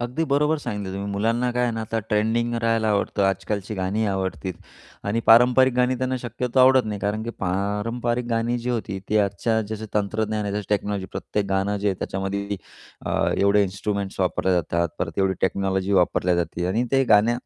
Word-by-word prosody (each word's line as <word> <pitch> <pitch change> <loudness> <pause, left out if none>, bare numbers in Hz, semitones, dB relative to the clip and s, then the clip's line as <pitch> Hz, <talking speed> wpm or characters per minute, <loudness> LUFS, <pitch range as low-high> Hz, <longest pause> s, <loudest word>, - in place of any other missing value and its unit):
अगदी 125 +7 -1
बरोबर 150 +2 +2
सांगितलं 105 -8 -4
तुम्ही 100 +1 -4
मुलांना 115 +5 0
काय 125 0 0
आहे 120 - +1
ना, 115 - -3
आता 115 +1 -2
ट्रेंडिंग 115 +2 +1
राहायला 115 -1 +2
आवडतं, 100 0 0
आजकालची 100 +2 -1
गाणी 95 +4 -1
आवडतील 95 -1 -2 0.6
आणि 115 +3 +1
पारंपरिक 125 +3 +6
गाणी 125 +1 +2
त्यांना 130 0 -1
शक्यतो 125 +1 -2
आवडत 130 -1 +6
नाही. 105 -2 -4
कारण 105 +2 -1
की 115 - -4
पारंपरिक 105 +6 -1
गाणी 115 +1 0
जी 120 +1 -3
होती, 105 -5 -3
ती 110 - +1
आजच्या 105 +3 +1
जसं 110 0 -5
तंत्रज्ञान 105 +1 -1
आहे 100 - -2
जसे 105 -1 -3
टेक्नॉलॉजी, 100 -2 -1
प्रत्येक 105 -1 -2
गाणं 95 +2 +1
जे 100 +1 0
आहे 95 - 0
त्याच्यामध्ये 100 +1 -3 0.5
अ, - - -1 0.3
एवढे 100 +1 +4
इन्स्ट्रुमेंट्स 100 0 -3
वापरले 95 0 +1
जातात, 85 0 0
परत - - -2
तेवढी 95 -1 +2
टेक्नॉलॉजी 95 +1 0
वापरल्या 90 -1 +2
जाते 85 +1 -2
आणि 110 +7 +1
ते 135 -1 +4
गण्या 115 +4 +3
105 Hz, 180 wpm, -23 LUFS, 100-120 Hz, 0.6 s, पारंपरिक